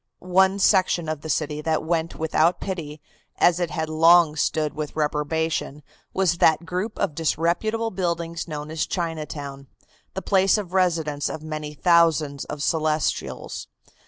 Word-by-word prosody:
One 190 +1 +5
section 185 -4 +3
of 155 -2 -3
the 160 - -7
city 150 -1 -1
that 160 0 0
went 165 0 -1
without 160 +2 +1
pity, 160 -6 -5 0.4
as 175 0 +4
it 175 -2 -1
had 160 -1 -3
long 165 0 +5
stood 155 0 0
with 150 -1 -5
reprobation, 150 0 -1 0.3
was 180 -3 +1
that 160 +1 +4
group 185 +6 -3
of 200 -6 -1
disreputable 175 +9 0
buildings 170 -2 -3
known 150 -1 -6
as 160 0 -2
Chinatown, 150 -5 -5 0.5
the 190 - -4
place 195 +1 +3
of 190 -4 -5
residence 160 -6 +1
of 155 - -6
many 155 -1 -5
thousands 160 -4 +3
of 150 -1 -5
Celestials. 155 -1 -1
160 Hz, 145 wpm, -24 LUFS, 155-175 Hz, 0.5 s, One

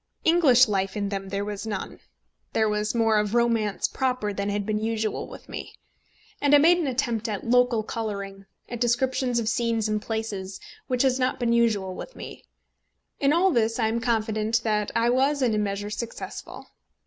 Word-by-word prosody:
English 290 -7 +6
life 195 -1 -1
in 200 -1 -1
them 195 -1 -4
there 200 +1 -2
was 205 +1 -5
none. 205 -3 -5 0.5
There 220 - +2
was 210 +1 -1
more 225 -2 +3
of 210 +2 -1
romance 230 -4 +1
proper 250 -6 -1
than 200 +1 -2
had 205 0 -2
been 215 0 -1
usual 220 -1 -2
with - - -12
me. - - -8 0.7
And 290 0 +5
I - - +9
made 340 +4 +5
an 325 - -1
attempt 240 -3 -1
at 205 -2 -4
local 245 -2 +3
colouring, 200 -3 -5 0.2
at 240 - -6
descriptions 250 +1 +1
of 230 -2 -1
scenes 230 -2 0
and 215 0 -1
places, 210 -4 -4 0.3
which 250 0 +1
has 260 -1 +2
not 255 0 0
been 235 -1 +1
usual 215 -5 +1
with - - -9
me. - - -9 0.8
In 280 0 +3
all 360 +4 +4
this 230 -4 +1
I 220 -3 +1
am 230 +1 -1
confident 220 -1 0
that 210 -2 0
I 235 +1 +3
was 270 +2 +2
in 235 -3 +2
a 215 - +1
measure 205 0 -2
successful. 230 +2 -7
225 Hz, 185 wpm, -25 LUFS, 210-245 Hz, 0.8 s, I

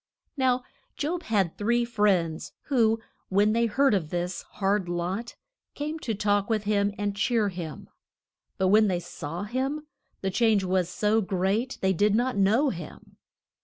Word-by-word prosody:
Now 255 -2 +2 0.3
Job 335 +4 -2
had 200 - 0
three 235 +3 +2
friends, 195 -8 0 0.2
who, 225 -5 +3 0.3
when 205 +3 +3
they 235 +1 +2
heard 270 +3 +3
of 175 -7 0
his 175 +2 -2
hard 195 -2 0
lot, 180 +7 -3 0.4
came 305 +2 -4
to 225 -7 -3
talk 205 0 +1
with 215 -2 +1
him 205 -1 +1
and 205 -1 -2
cheer 215 0 +1
him. 170 -5 -7 0.7
But 190 0 +2
when 215 +2 +5
they 180 -3 0
saw 165 +1 -6
him, 265 +7 -2 0.4
the 190 - -1
change 220 -1 +3
was 185 -2 +1
so 215 +3 +1
great 195 +6 -1
they 190 0 +2
did 205 +4 +2
not 250 +3 +1
know 215 +9 +3
him. 170 -4 -10
205 Hz, 160 wpm, -27 LUFS, 190-235 Hz, 0.7 s, when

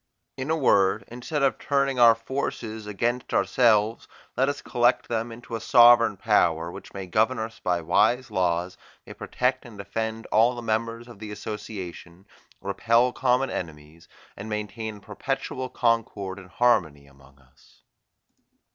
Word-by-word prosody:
In 130 +2 -5
a 160 - +2
word, 100 -7 +3
instead 125 +5 -3
of 135 - +1
turning 140 -2 0
our 115 -1 +7
forces 115 -2 -5
against 120 +4 -2
ourselves, 115 -2 +2 0.3
let 135 +3 +2
us 145 - -4
collect 120 +1 +1
them 115 0 -2
into 115 0 -8
a 115 - -5
sovereign 120 -3 +6
power, 85 -6 +1
which - - -11
may 95 -1 -6
govern 110 +8 +1
us 110 0 -5
by 90 -1 -1
wise 110 +9 +2
laws, 90 -2 -1 0.3
may - - -10
protect 125 0 -2
and 115 -4 -13
defend 110 +3 -4
all 115 +3 +4
the 120 - -7
members 115 +1 -2
of 120 -4 -13
the 110 -1 -8
association, 100 -4 -8 0.4
repel 115 +5 +2
common 130 0 +1
enemies, 80 0 -8 0.3
and 105 +2 -8
maintain 105 +1 -5
a - - -17
perpetual 130 +4 -4
concord 105 -6 -1
and 95 -1 -14
harmony 90 -12 +1
among 70 0 -21
us." 65 -2 -26
110 Hz, 150 wpm, -25 LUFS, 95-120 Hz, 0.4 s, our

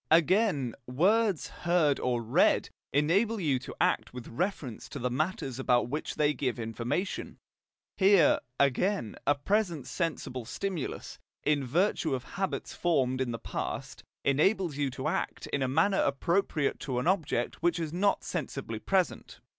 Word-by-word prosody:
Again, 165 - +3
words 190 - +2
heard 170 -5 +1
or 120 -2 0
read 115 - +3 0.2
enable 195 +11 +2
you 145 -8 +1
to - - -9
act - - +1
with 125 -2 -7
reference 150 - -3
to - - -6
the 125 +1 -2
matters 135 -2 -2
about 125 -2 +2
which 150 +4 -3
they 150 0 +2
give 125 -3 -2
information; 120 - -3 0.6
here, 190 -5 +5 0.2
again, 140 - +1
a 145 - +5
present 170 - 0
sensible 145 -7 -3
stimulus, 180 - -4 0.2
in 145 -2 +2
virtue 165 - +1
of 125 - -5
habits 195 +5 -3
formed 130 -7 +1
in 130 - 0
the 115 - -3
past, - - -5 0.2
enables 165 +4 +2
you 145 -1 0
to 125 - -4
act - - -2
in 140 - +1
a 130 - +2
manner 165 +9 +2
appropriate 150 +1 0
to 130 -4 -3
an 125 - -1
object 165 -9 0
which 175 0 +2
is 160 -2 -3
not 200 +3 +1
sensibly 135 -8 -4
present. 190 - -1
150 Hz, 150 wpm, -29 LUFS, 130-185 Hz, 0.6 s, here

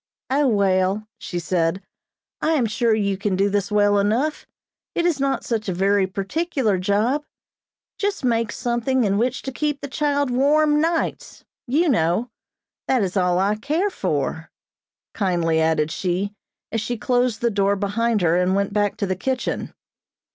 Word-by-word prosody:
"O, 285 +1 +3
well," 200 -1 +1
she 175 - -5
said, 170 0 0 0.6
"I 320 - +2
am 275 -7 +2
sure 225 +1 +1
you 200 -2 0
can 205 -2 0
do 195 +2 +1
this 200 0 -1
well 205 -1 +3
enough. 240 +10 0 0.5
It 340 - +1
is 335 -5 +1
not 275 0 0
such 220 -4 -2
a 180 - -2
very 195 +1 +2
particular 210 - -1
job; 215 +10 +1 0.8
just 400 -8 -1
make 230 -3 +1
something 240 +2 0
in 200 -1 +1
which 250 +2 -1
to 265 - -4
keep 295 +2 -2
the 280 - -6
child 285 -1 0
warm 295 +3 +3
nights, 330 +1 -2 0.2
you 305 +8 +2
know. 220 - +1 0.6
That 255 -5 +2
is 190 0 -3
all 180 -2 +2
I 195 +3 +2
care 315 - 0
for," 160 - -2 0.6
kindly 170 -5 +1
added 160 -1 +1
she, 190 +3 -2 0.4
as 225 - -1
she 240 +3 -3
closed 245 -1 0
the 235 -1 +2
door 200 0 +2
behind 210 +2 0
her 165 0 +3
and 180 +1 +2
went 200 0 0
back 205 -1 0
to 200 - -1
the 185 -1 -1
kitchen. 260 +7 -2
215 Hz, 165 wpm, -22 LUFS, 195-265 Hz, 0.8 s, O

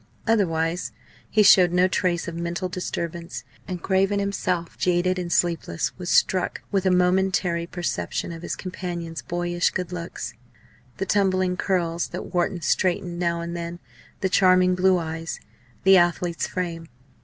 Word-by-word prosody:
Otherwise 175 -6 +1 0.4
he 215 - +4
showed 185 -3 +7
no 180 +1 +4
trace 180 -2 0
of 170 - -4
mental 170 +2 -3
disturbance; 170 -1 -5 0.2
and 180 -3 -5
Craven, 195 +1 +2
himself 185 -4 -2
jaded 180 +1 +1
and 175 -1 -4
sleepless, 125 - 0
was 180 -1 -4
struck 185 0 +2
with 195 -1 +1
a - - +5
momentary 180 -1 +2
perception 170 - -3
of 165 -1 -8
his - - -3
companion's 175 -3 -5
boyish 175 0 0
good 180 -1 -4
looks 170 -8 -5 0.6
the 195 - -2
tumbling 185 -2 +2
curls, 175 -3 0
that 180 - -7
Wharton 175 0 0
straightened 175 +2 0
now 170 -1 0
and 170 0 -5
then, 170 0 -5 0.4
the 190 - +1
charming 185 -1 +5
blue 185 0 +3
eyes, 165 -1 -4 0.4
the 190 0 +7
athlete's 175 -1 +1
frame. 170 -3 -4
180 Hz, 145 wpm, -24 LUFS, 170-185 Hz, 0.6 s, showed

